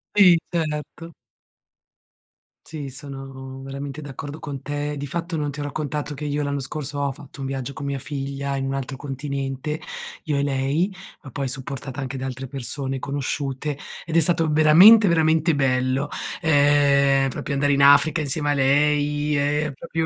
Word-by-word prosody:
I. 185 Hz, -5 st, +7 dB
Certo. 165 Hz, 0 st, -3 dB, 1.5 s
Sì, 150 Hz, -3 st, -6 dB
sono 135 Hz, -1 st, -8 dB
veramente 140 Hz, +2 st, -6 dB
d'accordo 145 Hz, +1 st, -7 dB
con 145 Hz, -3 st, -6 dB
te. 145 Hz, +1 st, -3 dB
Di 145 Hz, -, -4 dB
fatto 170 Hz, +2 st, -3 dB
non 145 Hz, -1 st, -1 dB
ti 145 Hz, +1 st, -6 dB
ho -, -, -2 dB
raccontato 150 Hz, 0 st, -3 dB
che 150 Hz, +1 st, -6 dB
io 145 Hz, 0 st, -1 dB
l'anno 140 Hz, 0 st, -1 dB
scorso 145 Hz, +1 st, -5 dB
ho 140 Hz, -1 st, 0 dB
fatto 145 Hz, +1 st, -13 dB
un 135 Hz, -, -3 dB
viaggio 135 Hz, 0 st, -4 dB
con 140 Hz, +1 st, -7 dB
mia 140 Hz, -1 st, -2 dB
figlia 140 Hz, 0 st, -4 dB
in 135 Hz, -, -2 dB
un 135 Hz, -, -2 dB
altro 135 Hz, 0 st, -4 dB
continente, 140 Hz, +1 st, -4 dB, 0.4 s
io 150 Hz, -2 st, -1 dB
e 140 Hz, -, +1 dB
lei, 140 Hz, +7 st, 0 dB, 0.3 s
ma 135 Hz, -, -10 dB
poi 135 Hz, +2 st, -2 dB
supportata 135 Hz, +1 st, -5 dB
anche 135 Hz, 0 st, -4 dB
da 130 Hz, -, -4 dB
altre 130 Hz, 0 st, -5 dB
persone 135 Hz, 0 st, -4 dB
conosciute, 140 Hz, +1 st, -3 dB, 0.3 s
ed 165 Hz, 0 st, 0 dB
è -, -, +8 dB
stato 165 Hz, -1 st, +2 dB
veramente, 175 Hz, +9 st, +8 dB
veramente 160 Hz, -1 st, +3 dB
bello, 130 Hz, +1 st, +1 dB, 0.3 s
ehm, 140 Hz, -3 st, +4 dB
proprio 140 Hz, +2 st, -4 dB
andare 145 Hz, +1 st, +2 dB
in 140 Hz, 0 st, +3 dB
Africa 145 Hz, +4 st, +6 dB
insieme 145 Hz, 0 st, -1 dB
a -, -, +3 dB
lei 145 Hz, +1 st, +2 dB
e 145 Hz, +1 st, +1 dB
proprio 165 Hz, +3 st, -3 dB
145 Hz, 170 wpm, -23 LUFS, 135-150 Hz, 1.5 s, è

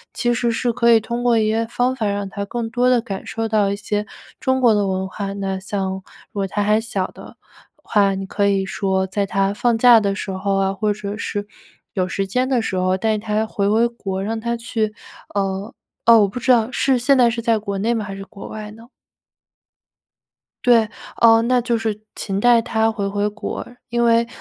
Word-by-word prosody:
其 240 Hz, -1 st, +1 dB
实 235 Hz, 0 st, 0 dB
是 235 Hz, +1 st, 0 dB
可 235 Hz, 0 st, +3 dB
以 225 Hz, -, +7 dB
通 235 Hz, +2 st, -4 dB
过 240 Hz, -2 st, +3 dB
一 215 Hz, -, +2 dB
些 225 Hz, +1 st, 0 dB
方 250 Hz, +2 st, 0 dB
法 225 Hz, -5 st, -1 dB
让 200 Hz, 0 st, -2 dB
他 200 Hz, +1 st, -5 dB
更 230 Hz, +2 st, -3 dB
多 245 Hz, +2 st, +2 dB
地 250 Hz, -1 st, +4 dB
感 200 Hz, -5 st, -6 dB
受 225 Hz, 0 st, -2 dB
到 215 Hz, -2 st, +2 dB
一 200 Hz, -, -1 dB
些 210 Hz, 0 st, -3 dB, 0.3 s
中 260 Hz, 0 st, +1 dB
国 240 Hz, -4 st, +5 dB
的 205 Hz, -1 st, +1 dB
文 190 Hz, 0 st, -1 dB
化。 195 Hz, +1 st, -5 dB
那 195 Hz, -1 st, -3 dB
像 190 Hz, 0 st, -3 dB, 0.3 s
如 205 Hz, -, -5 dB
果 195 Hz, -, 0 dB
他 205 Hz, +2 st, -1 dB
还 210 Hz, +1 st, +3 dB
小 205 Hz, -5 st, -2 dB
的 -, -, -13 dB, 0.5 s
话， 200 Hz, -2 st, +2 dB
你 195 Hz, 0 st, -4 dB
可 200 Hz, +1 st, 0 dB
以 195 Hz, -1 st, +1 dB
说 190 Hz, -1 st, -1 dB
在 200 Hz, +1 st, -1 dB
他 195 Hz, 0 st, 0 dB
放 235 Hz, +2 st, +1 dB
假 235 Hz, -1 st, +7 dB
的 200 Hz, -2 st, -1 dB
时 195 Hz, -1 st, -4 dB
候 195 Hz, +1 st, -1 dB
啊， 195 Hz, 0 st, +1 dB
或 210 Hz, +1 st, 0 dB
者 205 Hz, 0 st, -6 dB
是 205 Hz, -2 st, -3 dB, 0.5 s
有 185 Hz, -2 st, 0 dB
时 195 Hz, +2 st, -2 dB
间 250 Hz, +6 st, 0 dB
的 255 Hz, -3 st, +1 dB
时 195 Hz, -, -3 dB
候 185 Hz, 0 st, +2 dB
带 215 Hz, +2 st, 0 dB
他 215 Hz, 0 st, -1 dB
回 200 Hz, -2 st, -1 dB
回 225 Hz, +3 st, +3 dB
国， 195 Hz, -5 st, -4 dB
让 225 Hz, +2 st, -2 dB
他 235 Hz, +1 st, -2 dB
去， 225 Hz, -2 st, -2 dB, 0.4 s
呃 195 Hz, +1 st, -2 dB, 0.3 s
哦， 230 Hz, -1 st, +8 dB
我 205 Hz, -, +4 dB
不 245 Hz, -, -6 dB
知 255 Hz, -, +2 dB
道 230 Hz, 0 st, +2 dB
是 265 Hz, 0 st, +2 dB
现 265 Hz, +3 st, +3 dB
在 240 Hz, -2 st, +5 dB
是 230 Hz, 0 st, -3 dB
在 230 Hz, -1 st, +2 dB
国 200 Hz, -1 st, -4 dB
内 230 Hz, +4 st, +1 dB
吗？ 220 Hz, -3 st, -2 dB
还 195 Hz, -, -6 dB
是 195 Hz, -, -7 dB
国 200 Hz, 0 st, -11 dB
外 215 Hz, -1 st, -7 dB
呢？ 225 Hz, +2 st, -15 dB, 1.8 s
对， 230 Hz, -3 st, +5 dB, 0.3 s
呃， 225 Hz, -1 st, +7 dB
那 250 Hz, +1 st, +2 dB
就 235 Hz, -1 st, 0 dB
是 220 Hz, -2 st, -3 dB, 0.2 s
勤 195 Hz, -2 st, -3 dB
带 240 Hz, +1 st, +5 dB
他 225 Hz, -1 st, +1 dB
回 205 Hz, -3 st, -3 dB
回 205 Hz, +1 st, 0 dB
国。 210 Hz, +1 st, -5 dB, 0.2 s
因 235 Hz, 0 st, +1 dB
为， 230 Hz, 0 st, +3 dB
215 Hz, 235 characters per minute, -20 LUFS, 200-235 Hz, 1.8 s, 哦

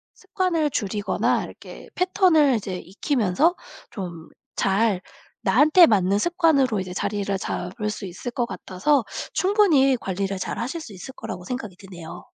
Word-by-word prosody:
습관을 335 Hz, -5 st, -1 dB
줄이거나 205 Hz, -1 st, 0 dB
이렇게 -, -, -11 dB
패턴을 360 Hz, -, +4 dB
이제 190 Hz, -4 st, -3 dB
익히면서 235 Hz, -, 0 dB, 0.4 s
좀 175 Hz, -5 st, -7 dB, 0.3 s
잘 195 Hz, -1 st, +1 dB, 0.4 s
나한테 305 Hz, -, +6 dB
맞는 200 Hz, -1 st, +2 dB
습관으로 295 Hz, -, +2 dB
이제 185 Hz, -1 st, -5 dB
자리를 200 Hz, 0 st, -2 dB
잡을 200 Hz, +5 st, -4 dB
수 210 Hz, -1 st, -5 dB
있을 185 Hz, +7 st, -6 dB
것 240 Hz, 0 st, -1 dB
같아서 240 Hz, +6 st, 0 dB, 0.3 s
충분히 340 Hz, -, +4 dB
관리를 195 Hz, +1 st, -3 dB
잘 185 Hz, -, -4 dB
하실 265 Hz, +8 st, -3 dB
수 235 Hz, -10 st, -10 dB
있을 185 Hz, +8 st, -9 dB
거라고 180 Hz, -, -7 dB
생각이 215 Hz, -3 st, -5 dB
드네요. 180 Hz, -4 st, -10 dB
220 Hz, 315 characters per minute, -24 LUFS, 190-295 Hz, 0.4 s, 나한테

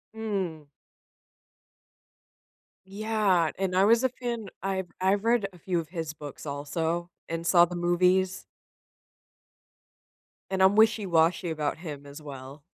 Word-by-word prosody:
Mm. 190 Hz, -9 st, -3 dB, 2.2 s
Yeah, 200 Hz, -4 st, +1 dB
and 190 Hz, -1 st, -1 dB
I 190 Hz, -, +5 dB
was 230 Hz, +3 st, +4 dB
a 260 Hz, -, +3 dB
fan. 240 Hz, -4 st, -5 dB, 0.2 s
I've 190 Hz, -2 st, -2 dB
I've 195 Hz, +2 st, +2 dB
read 230 Hz, -4 st, +3 dB
a -, -, -14 dB
few 175 Hz, 0 st, -1 dB
of 160 Hz, -, -6 dB
his 165 Hz, -3 st, -4 dB
books 150 Hz, -2 st, -9 dB
also 160 Hz, +4 st, -2 dB, 0.2 s
and 165 Hz, 0 st, -3 dB
saw 175 Hz, 0 st, +6 dB
the 175 Hz, +1 st, -7 dB
movies 180 Hz, +2 st, +2 dB, 2.1 s
and 190 Hz, 0 st, +2 dB
I'm 190 Hz, +2 st, +5 dB
wishy-washy 185 Hz, -6 st, +3 dB
about 155 Hz, -1 st, -2 dB
him 145 Hz, -5 st, -7 dB
as 140 Hz, +2 st, -10 dB
well. 140 Hz, 0 st, -10 dB
180 Hz, 125 wpm, -27 LUFS, 160-195 Hz, 2.2 s, saw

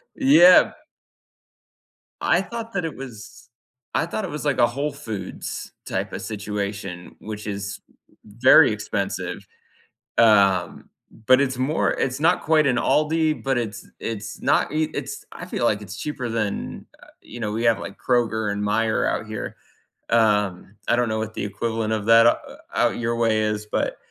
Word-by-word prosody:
Yeah. 265 Hz, -, +7 dB, 1.5 s
I 175 Hz, -, +3 dB
thought 230 Hz, +2 st, -7 dB
that 180 Hz, -4 st, -1 dB
it 160 Hz, -, -5 dB
was 115 Hz, -3 st, -11 dB, 0.4 s
I -, -, +1 dB
thought 200 Hz, +5 st, -4 dB
it 185 Hz, -, -6 dB
was 150 Hz, 0 st, -6 dB
like 140 Hz, -3 st, +1 dB
a 120 Hz, -, +6 dB
Whole 140 Hz, +5 st, -2 dB
Foods 110 Hz, -9 st, -6 dB
type -, -, -3 dB
of -, -, -5 dB
situation, 100 Hz, -3 st, -5 dB
which 105 Hz, 0 st, -7 dB
is 100 Hz, 0 st, -4 dB, 0.5 s
very 115 Hz, +3 st, +6 dB
expensive, 105 Hz, -2 st, -4 dB, 0.7 s
um, 100 Hz, -5 st, +3 dB, 0.4 s
but 130 Hz, +1 st, +6 dB
it's 130 Hz, -2 st, 0 dB
more 140 Hz, +5 st, +1 dB
it's 130 Hz, +2 st, -2 dB
not 170 Hz, +3 st, +3 dB
quite 155 Hz, -1 st, +3 dB
an 125 Hz, -3 st, +2 dB
Aldi, 155 Hz, +4 st, +1 dB
but 135 Hz, -2 st, 0 dB
it's 110 Hz, -3 st, -5 dB
it's 110 Hz, -1 st, -5 dB
not -, -, +2 dB
i 155 Hz, 0 st, 0 dB
it's -, -, -5 dB
I -, -, -8 dB
feel -, -, -3 dB
like 105 Hz, 0 st, +1 dB
it's 95 Hz, -1 st, -8 dB
cheaper 130 Hz, -3 st, -4 dB
than, 110 Hz, -3 st, -3 dB, 0.2 s
uh, -, -, -15 dB, 0.2 s
you 120 Hz, -, -10 dB
know, 105 Hz, -2 st, -2 dB
we 115 Hz, +2 st, -2 dB
have, 115 Hz, -3 st, +4 dB
like, 100 Hz, -, -8 dB
Kroger 110 Hz, -4 st, 0 dB
and 100 Hz, 0 st, -3 dB
Meyer 110 Hz, +2 st, +1 dB
out 110 Hz, -, -1 dB
here. 110 Hz, -1 st, -6 dB, 0.5 s
Um, 105 Hz, -4 st, +1 dB
I -, -, +3 dB
don't 120 Hz, -1 st, +1 dB
know 110 Hz, -, -1 dB
what 110 Hz, 0 st, -4 dB
the -, -, -3 dB
equivalent 110 Hz, +2 st, -2 dB
of 105 Hz, -2 st, -2 dB
that 115 Hz, 0 st, +7 dB
out -, -, +3 dB, 0.3 s
out -, -, +1 dB
your 115 Hz, 0 st, -1 dB
way 110 Hz, -2 st, +2 dB
is, 105 Hz, 0 st, -2 dB
but, -, -, -1 dB
115 Hz, 170 wpm, -23 LUFS, 105-135 Hz, 1.5 s, Yeah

